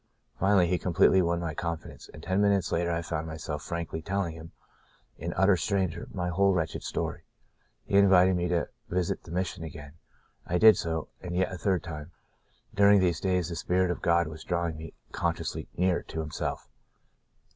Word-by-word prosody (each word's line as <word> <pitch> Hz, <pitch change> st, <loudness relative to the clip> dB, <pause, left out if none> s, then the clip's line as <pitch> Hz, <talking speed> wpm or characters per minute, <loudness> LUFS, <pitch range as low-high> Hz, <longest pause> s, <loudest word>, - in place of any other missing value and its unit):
Finally 95 Hz, -2 st, +4 dB
he 90 Hz, 0 st, 0 dB
completely 95 Hz, +1 st, +4 dB
won 85 Hz, -1 st, 0 dB
my 85 Hz, -2 st, -3 dB
confidence, 85 Hz, +1 st, -6 dB
and 80 Hz, -, -12 dB
ten 95 Hz, +3 st, +1 dB
minutes 100 Hz, -3 st, +2 dB
later 85 Hz, 0 st, 0 dB
I 85 Hz, 0 st, -1 dB
found 80 Hz, -1 st, -3 dB
myself 80 Hz, -1 st, -5 dB
frankly 85 Hz, -1 st, -4 dB
telling 100 Hz, -1 st, -2 dB
him 80 Hz, 0 st, -11 dB, 0.3 s
— -, -, -36 dB
an 85 Hz, +3 st, -3 dB
utter 95 Hz, 0 st, +5 dB
stranger 90 Hz, -2 st, -1 dB
— -, -, -16 dB
my 90 Hz, -2 st, -2 dB
whole 100 Hz, +3 st, +3 dB
wretched 80 Hz, -3 st, -2 dB
story. -, -, -3 dB, 0.6 s
He 100 Hz, -, +2 dB
in 100 Hz, -1 st, +6 dB
vited 95 Hz, 0 st, +5 dB
me 90 Hz, 0 st, 0 dB
to 85 Hz, -1 st, 0 dB, 0.2 s
visit 90 Hz, -1 st, -1 dB
the -, -, -15 dB
Mission 90 Hz, -1 st, -2 dB
again. 75 Hz, -2 st, -9 dB, 0.5 s
I 90 Hz, -, -1 dB
did 110 Hz, +2 st, +8 dB
so 80 Hz, -1 st, -3 dB
— -, -, -39 dB
and 90 Hz, -1 st, -5 dB
yet 95 Hz, +1 st, 0 dB
a -, -, -5 dB
third 95 Hz, -2 st, +1 dB
time. 80 Hz, -2 st, -7 dB, 0.6 s
During 100 Hz, 0 st, +6 dB
these 85 Hz, -4 st, +1 dB
days 90 Hz, -2 st, 0 dB
the 85 Hz, -, -4 dB
spirit 90 Hz, +1 st, +1 dB
of 90 Hz, -, -4 dB
God 85 Hz, 0 st, +3 dB
was 80 Hz, 0 st, -8 dB
drawing 85 Hz, -2 st, -1 dB
me 80 Hz, 0 st, -9 dB, 0.2 s
consciously -, -, -2 dB
nearer 90 Hz, 0 st, +2 dB
to 80 Hz, -, -7 dB
Himself. 75 Hz, -2 st, -4 dB
85 Hz, 195 wpm, -28 LUFS, 80-95 Hz, 0.6 s, did